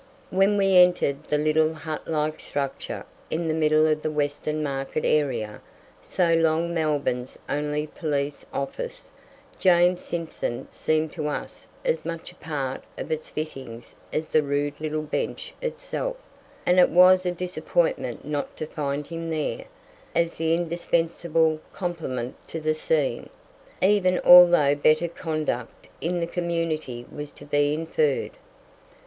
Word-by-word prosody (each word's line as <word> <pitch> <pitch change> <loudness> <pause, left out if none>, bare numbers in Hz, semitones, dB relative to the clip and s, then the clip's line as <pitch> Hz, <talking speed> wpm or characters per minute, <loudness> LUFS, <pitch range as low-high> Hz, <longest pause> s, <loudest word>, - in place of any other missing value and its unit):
When 195 +2 +3
we 195 -2 +4
entered 180 -6 +4
the 150 - +1
little 155 +1 +2
hut 155 0 -6
like 155 -1 -1
structure 140 -2 -4 0.2
in 165 +1 -1
the 160 - +1
middle 155 0 +4
of 155 -1 +1
the 155 - -1
Western 150 +1 -1
Market 135 +1 -2
area, 120 -8 0 0.4
so 170 -2 +1
long 165 +1 +2
Melbourne's 145 -6 -1
only 150 +1 -1
police 145 -2 -3
office, 475 - -5 0.5
James 180 -1 +4
Simpson 165 -8 -4
seemed 155 0 0
to 155 -3 -3
us 150 - -4 0.2
as - - +1
much 165 -1 -5
a - - -20
part 140 -4 -4
of - - -5
its 155 0 -3
fittings 130 -7 -6 0.2
as 155 0 -2
the 155 - +4
rude 145 +1 -2
little 155 0 -2
bench 155 - -3
itself; - - -3 0.5
and 180 +1 +4
it 180 - +6
was 185 +1 +7
a 180 - 0
disappointment 345 - -1
not 145 -1 -3
to 155 - -3
find 145 -2 -3
him 165 +1 -5
there, 155 -2 -2 0.5
as 170 0 +1
the 165 0 +2
indispensable 165 -1 +1
complement 155 -9 -3
to 165 - -5
the 155 0 +1
scene, 150 -5 0 0.5
even 190 -2 +4
although 175 -5 +9
better 155 +3 +3
conduct 160 -2 -4
in 175 +2 -1
the 170 - 0
community 165 -8 -2
was 150 0 -7
to 145 - -13
be 145 0 +2
inferred. 155 -3 0
155 Hz, 140 wpm, -25 LUFS, 150-170 Hz, 0.5 s, although